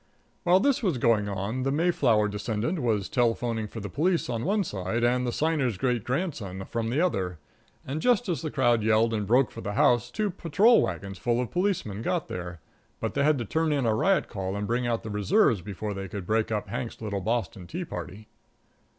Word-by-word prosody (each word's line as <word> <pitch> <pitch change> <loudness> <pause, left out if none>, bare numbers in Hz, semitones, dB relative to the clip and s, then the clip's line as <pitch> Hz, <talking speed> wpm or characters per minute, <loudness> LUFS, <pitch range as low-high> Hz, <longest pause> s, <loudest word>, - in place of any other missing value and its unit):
While 180 +2 +6
this 280 +5 +2
was 185 - +1
going 110 -4 +2
on, 100 +6 -3
the 135 +1 0
Mayflower 140 -9 +2
descendant 105 - -2
was 110 -5 0
telephoning 115 -2 0
for 115 - -8
the 105 - -4
police 170 - +1
from 115 -2 -3
one 205 +4 +1
side 100 - -2
and 125 +1 +2
the - - 0
Signer's 145 - 0
great 120 0 0
grandson 120 - -3
from 115 -1 -2
the 130 +6 0
other, 95 - 0 0.5
and 145 +4 -3
just 245 -2 +2
as 175 -4 -1
the 160 - -3
crowd 120 -5 +2
yelled 110 +1 +3
and 105 -2 -1
broke 125 +4 +3
for 115 - -8
the 105 - -4
house 120 +2 +3
two 210 -2 -1
patrol 195 +7 +4
wagons 95 -1 -4
full 120 0 +1
of 125 -2 -2
policemen 175 - -1
got 170 +7 -1
there. 90 -2 -6 0.4
But - - -3
they - - +1
had 150 0 +4
to 120 - -3
turn 160 +7 0
in 140 -4 +1
a 110 - +3
riot 190 - +2
call 95 -2 -4
and 100 0 -2
bring 120 +3 0
out 115 -1 -1
the 110 - -5
reserves 105 - +3
before 105 +2 -5
they 95 0 -5
could 95 -1 -6
break 110 +3 0
up 105 -1 -2
Hank's 115 +3 -4
little 100 -3 -3
Boston 100 -4 -2
tea 175 +2 -4
party. 95 - -7
115 Hz, 210 wpm, -27 LUFS, 105-150 Hz, 0.5 s, While